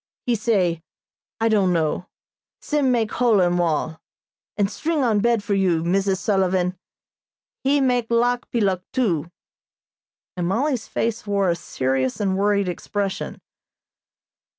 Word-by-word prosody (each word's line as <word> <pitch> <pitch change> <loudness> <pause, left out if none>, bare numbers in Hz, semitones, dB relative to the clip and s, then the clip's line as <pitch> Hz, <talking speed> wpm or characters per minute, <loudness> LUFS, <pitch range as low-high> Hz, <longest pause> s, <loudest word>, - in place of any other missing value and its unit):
He 245 - +1
say, 195 -7 +1 0.6
'I 225 0 +2
don't 195 -4 +3
know.' 165 +2 -1 0.5
Sim 290 -4 +1
make 225 -3 +1
hole 235 -4 +3
in 175 -1 +2
wall, 160 -1 -1 0.6
and 205 -2 +2
string 310 +7 -1
on 220 -4 +2
bed 235 -1 +2
for 205 - -1
you, 180 -4 +2
Mrs. 190 +2 +1
Sullivan. 185 -3 +1 0.9
He 280 +2 +3
make 245 -3 +1
lock 240 +1 +1
peeluk, 195 -6 +1
too," 175 - 0 1.1
and 175 -1 -2
Mollie's 245 +4 0
face 230 -1 -2
wore 200 -3 +2
a - - 0
serious 130 -5 -2
and 195 -2 0
worried 200 0 +1
expression. 195 +2 -3
200 Hz, 130 wpm, -22 LUFS, 180-235 Hz, 1.1 s, don't